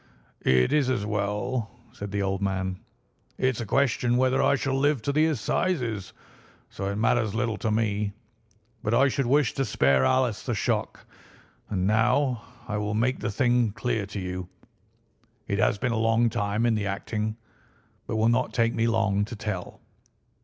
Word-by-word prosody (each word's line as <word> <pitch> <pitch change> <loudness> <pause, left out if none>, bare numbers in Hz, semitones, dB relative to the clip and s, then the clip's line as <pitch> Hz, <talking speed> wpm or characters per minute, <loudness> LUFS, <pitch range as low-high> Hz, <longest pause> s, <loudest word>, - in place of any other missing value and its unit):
"It's 65 - +3
as 120 -6 0
well," 105 +3 -2 0.2
said 105 -5 -7
the 100 -1 -1
old 95 0 -1
man; 95 -1 -2 0.6
"it's 130 -2 0
a 115 - -5
question 125 -1 +2
whether 130 +1 +3
I - - +4
shall 135 0 -1
live 135 -2 +1
to 140 - 0
the 155 +2 +3
Assizes, 120 - -1 0.6
so 100 - -5
it 100 +1 -2
matters 110 -1 +1
little 115 -2 -1
to 110 - -2
me, 105 -2 0 0.7
but 110 +3 0
I 140 +1 +5
should 135 -1 -1
wish 140 -1 +3
to 135 - 0
spare 70 - +3
Alice 125 - +2
the - - -2
shock. - - -2 0.6
And 95 -2 -1
now 120 +4 +2 0.3
I 105 - -2
will 105 0 -2
make 125 +4 +1
the - - -2
thing 120 0 +2
clear 110 -4 -2
to 100 - -5
you; 90 -1 -5 1.0
it - - -1
has - - +3
been 125 +4 -1
a 115 - 0
long 115 +1 +3
time 105 0 0
in 120 - +3
the 105 -2 -1
acting, 105 +2 -3 0.7
but - - -2
will 110 +1 +3
not 125 +2 +1
take 115 -1 +2
me 115 0 +1
long 110 -3 +2
to 115 - -7
tell. 105 -4 -5
110 Hz, 175 wpm, -26 LUFS, 100-125 Hz, 1.0 s, I